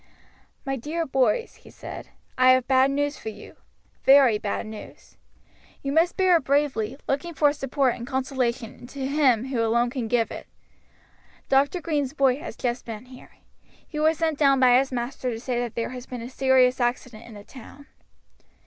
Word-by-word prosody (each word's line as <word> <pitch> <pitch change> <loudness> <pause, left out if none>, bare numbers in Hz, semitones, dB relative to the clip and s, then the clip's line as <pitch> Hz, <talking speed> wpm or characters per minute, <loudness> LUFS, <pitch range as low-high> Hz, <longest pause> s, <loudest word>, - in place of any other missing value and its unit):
"My 270 0 -2
dear 315 +7 -3
boys," 270 - 0
he - - -17
said, - - -9 0.3
"I 255 0 +6
have 255 -1 +1
bad 265 0 +4
news 290 +1 -1
for 220 - -6
you. 210 -1 -12 0.5
Very 265 -6 +6
bad 205 +1 -3
news. 215 -1 -11 0.7
You 275 - -2
must 330 +4 +2
bear 370 -2 +5
it 320 - -5
bravely, 270 -4 0
looking 295 +5 -2
for 290 -1 +3
support 270 -2 0
and 235 - -8
consolation 260 -3 -3
to 270 +1 -6
Him 265 -4 +2
who 250 -4 -1
alone 235 +2 +1
can 245 -3 -3
give 230 0 0
it. - - -8 1.0
Dr. 280 +6 +2
Green's 290 -5 -2
boy 270 -3 +2
has 340 - -8
just 245 0 -2
been 225 0 -8
here. 255 0 -15 0.5
He 300 - -6
was 315 +1 +2
sent 320 -3 -1
down 275 -2 +4
by 250 -1 +6
his 270 0 -2
master 250 +1 -3
to 225 -2 -4
say 245 0 -2
that 240 -2 -4
there 230 - -2
has 250 0 -9
been 245 -2 -7
a 245 - -8
serious 260 -1 +3
accident 240 -2 -2
in 225 - -12
the 205 - -11
town." 270 +4 -14
260 Hz, 185 wpm, -24 LUFS, 240-285 Hz, 1.0 s, I